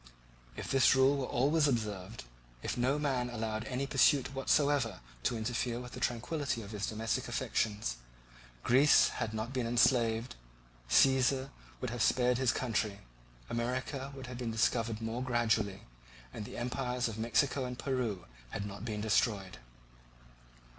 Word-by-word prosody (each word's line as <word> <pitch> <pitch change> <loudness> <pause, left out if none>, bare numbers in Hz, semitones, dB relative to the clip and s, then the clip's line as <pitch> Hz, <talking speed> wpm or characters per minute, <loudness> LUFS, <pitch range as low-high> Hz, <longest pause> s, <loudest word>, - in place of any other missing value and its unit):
If - - -5
this 135 -1 +5
rule 135 +2 +4
were 130 -2 -2
always 145 +5 +2
observed; 105 -4 -3 0.4
if - - -2
no 130 +4 +1
man 130 -4 0
allowed 110 -2 -3
any 130 +3 -2
pursuit 135 0 +3
whatsoever 135 -5 +1 0.2
to 115 - 0
interfere 120 +1 -2
with 125 0 -8
the - - -7
tranquillity 125 0 -2
of 100 - -10
his 105 -2 -3
domestic 110 +1 -2
affections, 105 - -1 0.7
Greece 135 +4 +6
had 110 - -3
not 110 +3 -4
been 125 -3 -1
enslaved, 120 -1 +2 0.5
Cæsar 135 0 +4 0.3
would 125 - -2
have 120 -1 -3
spared 125 +1 +3
his 130 -2 +3
country, 110 -5 -1 0.5
America 130 +3 -3
would 135 -1 -8
have 125 0 -7
been 120 -2 -2
discovered 115 0 0
more 115 +2 -3
gradually, 115 -5 0 0.5
and 105 - -6
the - - -8
empires 125 0 -1
of 110 -1 -6
Mexico 130 +4 +1
and 125 0 -5
Peru 115 -8 -2 0.2
had 100 - -4
not 100 0 -7
been 105 -3 -3
destroyed. 105 -3 0
120 Hz, 145 wpm, -32 LUFS, 110-130 Hz, 0.7 s, Greece